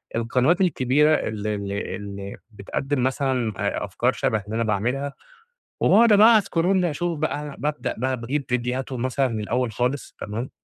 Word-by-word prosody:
القنوات 125 +10 +2
الكبيرة 150 -3 +3
اللي 105 -3 -2
اللي 100 0 -4
اللي 100 -1 -7
بتقدّم 125 +6 -2
مثلًا 130 -4 0
أ - - -1
أفكار - - 0
شبه 110 -2 0
اللي 110 +1 -5
أنا 115 - +1
باعملها، 125 +7 -1 0.7
وباقعُد 225 +1 +5
بقى 220 +2 +7
اسكرول 185 -1 +1
اشوف 170 0 -1
بقى 150 -1 -1
أنا 145 -2 -7
بابدأ 150 0 -2
بقى 130 +1 0
باجيب 135 +5 -2
فيديوهاتهم 125 +1 -2
مثلًا 130 +1 +1
من 110 -2 -3
الأول 120 +2 -1
خالص 125 +4 -2
تمام، 115 +5 -4
130 Hz, 160 wpm, -23 LUFS, 115-150 Hz, 0.7 s, بقى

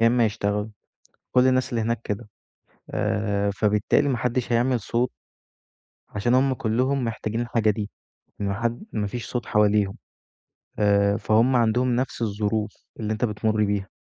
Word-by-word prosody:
يا 115 - +5
إما 120 0 +4
يشتغلوا 105 0 -1 0.6
كُل 125 +1 +5
الناس 130 0 +2
اللي 115 -2 -1
هناك 115 0 -1
كده 105 +2 -4 0.6
آآ، 100 -1 0
فبالتالي 105 +7 +2
ما 125 -3 0
حدش 125 0 -1
هيعمل 120 +1 +2
صوت. 120 +4 0 1.0
عشان 120 +4 0
هُم 135 +1 +3
كُلهم 125 +4 0
محتاجين 110 0 -3
الحاجة 115 -2 +1
دي، 105 0 -3 0.5
ما 100 -1 -1
حد 120 - -2
ما 105 -1 -1
فيش 120 +3 -5
صوت 125 -1 -4
حواليهم. 105 -1 +2 0.8
آآ، 100 0 +3
فهُم 115 +4 +3
عندهم 120 +1 +2
نفس 130 -1 -2
الظروف 105 0 -1 0.3
اللي 110 0 -1
أنت 110 +3 0
بتمُر 110 0 0
بيها 100 -1 -1
110 Hz, 150 wpm, -24 LUFS, 105-120 Hz, 1.0 s, يا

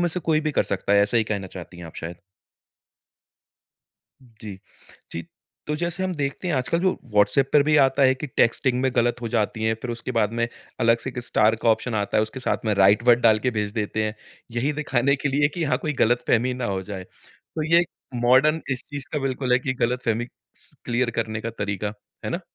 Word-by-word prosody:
में 175 - +2
से 180 +2 -1
कोई 155 -1 +1
भी 155 0 -1
कर - - +2
सकता 100 +1 -2
है। 100 0 +6
ऐसा 110 +3 +1
ही 110 - +3
कहना 100 -3 -3
चाहती 90 -1 -10
हैं 85 - -8
आप 80 - -12
शायद। 85 +1 -6 2.1
जी, 110 -5 -11 0.5
जी। 85 - -4 0.4
तो 150 - -1
जैसे 170 +3 -2
हम 185 - -1
देखते 145 +4 -3
हैं 170 - +1
आजकल 130 +5 0
जो 185 0 +2 0.2
व्हाट्सऐप 105 +6 +3
पर 145 - +6
भी 150 +1 +3
आता 135 -1 +4
है 130 0 +5
कि 130 +3 -6
टेक्स्टिंग 125 +2 +2
में 130 0 +1
गलत 120 +1 +2
हो 115 - -2
जाती 110 -1 -1
है 110 0 +2
फिर 125 - -3
उसके 120 +2 -5
बाद 105 +1 +1
में 115 0 0 0.3
अलग 115 0 +4
से 130 - -5
एक 125 - -8
स्टार 110 -1 +3
का - - +2
ऑप्शन 115 +1 0
आता 100 -1 -1
है। 110 - +4
उसके 110 +5 -5
साथ 125 - -1
में 110 - +1
राइट 100 +3 +5
वर्ड 120 0 +6
डाल 110 -2 +5
के 125 - 0
भेज 105 -1 -2
देते 110 -1 -1
हैं। 105 0 -2 0.4
यही 135 +5 +1
दिखाने 140 -2 +1
के 145 - -2
लिए 145 +1 +2
कि 170 - -1
हाँ, 145 - +1
कोई 150 - -2
गलतफ़हमी 120 0 +2
ना 125 -1 -4
हो 95 -3 -1
जाए। 95 -1 -7
तो 155 - -10
ये 170 +1 +6 0.3
मॉडर्न 130 +6 +4
इस 130 -1 -1
चीज़ 145 -2 -6
का 150 - 0
बिल्कुल 130 -2 -1
है 125 - +5
कि 130 0 -2
गलतफ़हमी 120 -1 -1 0.3
स - - -10
क्लियर 120 0 0
करने 110 -1 -3
का 115 - -4
तरीका, 100 0 -2 0.3
है - - -2
ना? - - -2
120 Hz, 225 wpm, -24 LUFS, 110-140 Hz, 2.1 s, है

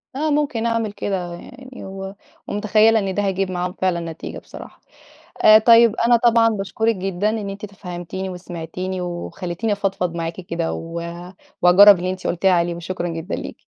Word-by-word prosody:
آه 305 +3 -1
ممكن 285 -6 0
أعمل 230 -2 0
كده 185 -4 -4
يعني، 255 +8 -11
و 195 0 -7 0.3
ومتخيلة 215 +2 +3
إن 195 -2 -2
ده 205 +2 -1
هيجيب 195 -1 -1
معاهم 180 0 -3
فعلًا، 185 -2 -1
نتيجة 160 - -8
بصراحة، - - -13 0.6
آآ، 215 0 +9
طيب 230 0 +6
أنا 240 0 +6
طبعًا 235 -1 +4
باشكرِك 220 +2 -1
جدًا 190 +2 -1
إن 215 -2 -3
أنتِ 200 +2 -8
تفهمتيني 185 -1 -7
وسمعتيني 180 +1 -6
وخلِّتيني 180 +3 -4
أفضفض 195 -3 -2
معاكِ 165 -1 -3
كده، 170 -2 -3
و 165 +1 -5 0.6
وهاجرب 195 +2 +8
اللي 180 +1 -2
أنتِ 185 - -5
قلتِ 175 +2 -3
لي 190 - +6
عليه، 175 -1 +1
وشكرًا 175 +1 -4
جدًا 165 +2 -5
ليكِ. - - -9
195 Hz, 165 wpm, -21 LUFS, 175-215 Hz, 0.6 s, آآ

